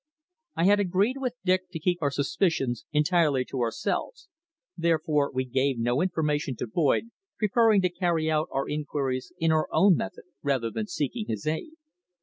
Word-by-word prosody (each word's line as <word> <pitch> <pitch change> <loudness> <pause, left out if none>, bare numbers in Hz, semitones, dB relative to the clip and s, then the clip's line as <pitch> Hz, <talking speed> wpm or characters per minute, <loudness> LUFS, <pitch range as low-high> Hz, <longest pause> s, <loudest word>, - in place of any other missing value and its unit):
I 165 - 0
had 205 +2 +5
agreed 200 +6 +1
with 255 -2 -2
Dick 185 0 +1
to 165 - -4
keep 175 +2 0
our 145 - +2
suspicions 140 -2 0
entirely 150 -3 +2
to 130 - -5
ourselves, 120 - -2 0.5
therefore 160 -4 +1
we 130 0 -1
gave 130 +1 0
no 120 +3 +1
information 150 -6 0
to - - -4
Boyd, 160 - +1 0.3
preferring 215 -1 +3
to 180 - +3
carry 175 -3 0
out 155 0 +1
our 135 0 -1
inquiries 145 -2 -3
in 165 -1 +2
our 155 -1 +2
own 195 -2 +5
method 95 - -5 0.2
rather 130 -5 0
than 215 - -3
seeking 180 - -3
his 110 -2 -4
aid. 160 - -2
155 Hz, 165 wpm, -27 LUFS, 140-185 Hz, 0.5 s, had